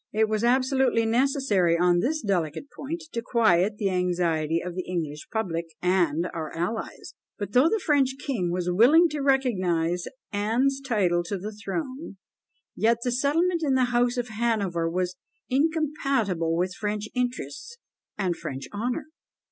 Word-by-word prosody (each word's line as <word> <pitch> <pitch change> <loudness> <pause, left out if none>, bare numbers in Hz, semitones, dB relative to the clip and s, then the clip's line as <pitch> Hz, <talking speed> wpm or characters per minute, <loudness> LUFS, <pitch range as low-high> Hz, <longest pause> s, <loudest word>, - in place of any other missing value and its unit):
It 220 +1 +2
was 215 0 -1
absolutely 255 -1 +2
necessary, 225 - +2
on 175 0 +3
this 310 - -1
delicate 185 - -2
point, 325 +4 -5
to 230 - -3
quiet 205 -4 +2
the 200 -2 0
anxiety 170 -3 0
of 180 +1 -5
the 185 - -3
English 160 -5 -4
public 170 -7 -2
and 175 -2 +1
our 160 -3 -4
allies; 180 +7 -4 0.2
but 205 -2 -5
though 255 +8 +5
the 445 - +1
French 275 -3 +3
king 250 -11 -2
was 180 0 -2
willing 290 - +6
to 300 -1 -3
recognise 185 -11 +1 0.2
Anne's 240 +7 +1
title 190 -9 +1
to 200 +3 -3
the 205 +4 -6
throne, 255 +4 -5 0.6
yet 230 +1 +3
the 245 - 0
settlement 330 +7 +1
in 280 -4 +1
the 255 -1 +2
house 245 +1 +2
of 245 0 -2
Hanover 210 -7 0
was 180 +1 -2 0.3
incompatible 275 - 0
with 180 +1 0
French 210 0 -3
interests 250 - -4 0.4
and 185 -4 0
French 135 -6 -6
honour. 245 +8 -2
215 Hz, 150 wpm, -26 LUFS, 180-265 Hz, 0.6 s, willing